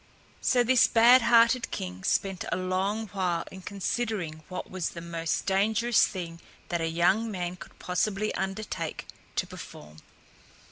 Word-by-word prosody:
So 245 -1 +3
this 250 +1 +5
bad 240 +3 +7
hearted 235 +1 +4
king 90 0 -5
spent 195 -2 0
a - - +1
long 190 +4 -1
while 180 -3 -1
in 190 - -10
considering 195 -4 -3
what 185 - -5
was 185 -3 -2
the 170 - -8
most 165 -1 -3
dangerous 220 +4 +3
thing 170 -3 -7 0.3
that 170 -1 -1
a 165 - 0
young 180 +7 +2
man 180 -3 -3
could - - -13
possibly 200 +3 -1
undertake 190 -4 -4 0.3
to - - 0
perform. 75 +1 -11
190 Hz, 145 wpm, -28 LUFS, 170-220 Hz, 0.3 s, bad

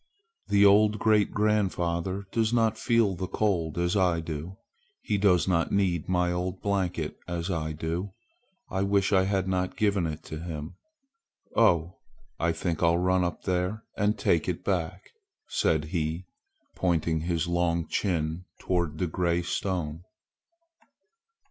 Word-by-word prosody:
"The 100 0 +5
old 105 +1 +5
great 110 -1 +3
grandfather 95 -3 0
does 110 -1 +1
not 115 -2 +2
feel 115 -4 +2
the 95 +1 -4
cold 90 -6 0
as 85 +2 +1
I 90 -4 +2
do. 80 +3 -6 0.5
He 105 -2 0
does 95 -4 +3
not 85 -3 +1
need 90 -5 0
my 90 -1 +2
old 90 +1 -3
blanket 90 -6 -2
as 85 +1 -3
I 80 -2 -2
do. 85 +5 -3 0.6
I 95 - -2
wish 100 0 +2
I 95 -1 +4
had 95 -1 0
not 90 -1 -1
given 100 -5 +1
it 80 -1 -6
to 80 - -7
him. 80 -2 -6 0.8
Oh! 90 -6 +3 0.4
I 85 0 +2
think 85 0 -3
I'll 85 0 +4
run 90 +1 +2
up 85 - -3
there 90 +4 -1
and 105 +1 +1
take - - +1
it - - -3
back!" - - -2 0.4
said 80 -1 +1
he, 80 +1 -2 0.5
pointing 85 -3 0
his 85 +1 -1
long 85 -2 0
chin 85 -2 -1
toward 85 -4 -1
the - - -1
large 80 - -5
gray 85 -1 +1
stone. 85 -4 -2
90 Hz, 150 wpm, -27 LUFS, 85-100 Hz, 0.8 s, The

